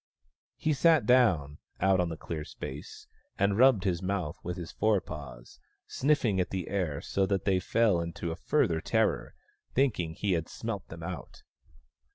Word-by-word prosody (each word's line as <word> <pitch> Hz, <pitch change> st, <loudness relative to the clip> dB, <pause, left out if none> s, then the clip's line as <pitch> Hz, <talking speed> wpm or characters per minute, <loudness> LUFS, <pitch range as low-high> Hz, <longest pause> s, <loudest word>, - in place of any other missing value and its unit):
He 155 Hz, -, 0 dB
sat 160 Hz, +3 st, +4 dB
down, 90 Hz, -, +3 dB, 0.2 s
out 95 Hz, -1 st, +3 dB
on 90 Hz, -1 st, +1 dB
the 80 Hz, -, -5 dB
clear 80 Hz, -1 st, -5 dB
space, 70 Hz, -1 st, -8 dB, 0.3 s
and 100 Hz, 0 st, +2 dB
rubbed 125 Hz, -4 st, +5 dB
his 90 Hz, -4 st, 0 dB
mouth 90 Hz, -4 st, -2 dB
with 90 Hz, +1 st, -4 dB
his 85 Hz, -2 st, -6 dB
forepaws, 75 Hz, -, -2 dB, 0.3 s
snifhng 125 Hz, -9 st, +1 dB
at 90 Hz, -, -2 dB
the 95 Hz, -3 st, -4 dB
air 90 Hz, -8 st, -1 dB
so 95 Hz, -1 st, 0 dB
that 100 Hz, -1 st, -1 dB
they 95 Hz, -2 st, +3 dB
fell 105 Hz, -3 st, +2 dB
into 85 Hz, 0 st, -4 dB
a -, -, -3 dB
further 80 Hz, -1 st, +1 dB
terror, -, -, 0 dB, 0.4 s
thinking 105 Hz, -12 st, +1 dB
he 100 Hz, +3 st, -1 dB
had 85 Hz, -2 st, 0 dB
smelt 110 Hz, -5 st, -5 dB
them 80 Hz, 0 st, -9 dB
out. 85 Hz, -4 st, -7 dB
95 Hz, 165 wpm, -29 LUFS, 80-105 Hz, 0.4 s, rubbed